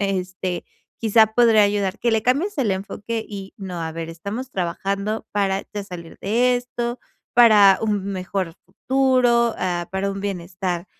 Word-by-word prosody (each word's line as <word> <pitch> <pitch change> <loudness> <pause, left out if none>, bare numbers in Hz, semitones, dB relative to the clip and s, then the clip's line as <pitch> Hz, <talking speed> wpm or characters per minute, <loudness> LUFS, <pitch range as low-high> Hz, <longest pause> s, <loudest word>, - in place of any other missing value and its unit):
este, 185 -2 -2 0.4
quizá 220 0 +5
podría 225 -3 +6
ayudar 200 -1 0
que 240 - +1
le 220 - +2
cambies 285 - +1
el 240 -7 +2
enfoque 210 +4 -3
y 195 -2 -8
no, 185 -4 -6
a 160 - -3
ver, 165 0 -5
estamos 200 +10 -6
trabajando 195 +3 -2
para 195 -1 0
ya 205 - -3
salir 175 -4 -10
de 245 +5 +2
esto, 245 0 -4 0.3
para 215 -5 +7
un 205 -3 0
mejor 185 -2 -3
futuro, 245 +2 +2
ah, 175 -2 -2
para 190 +1 -1
un 195 - -6
bienestar, 180 -2 -3
200 Hz, 155 wpm, -22 LUFS, 185-230 Hz, 0.4 s, para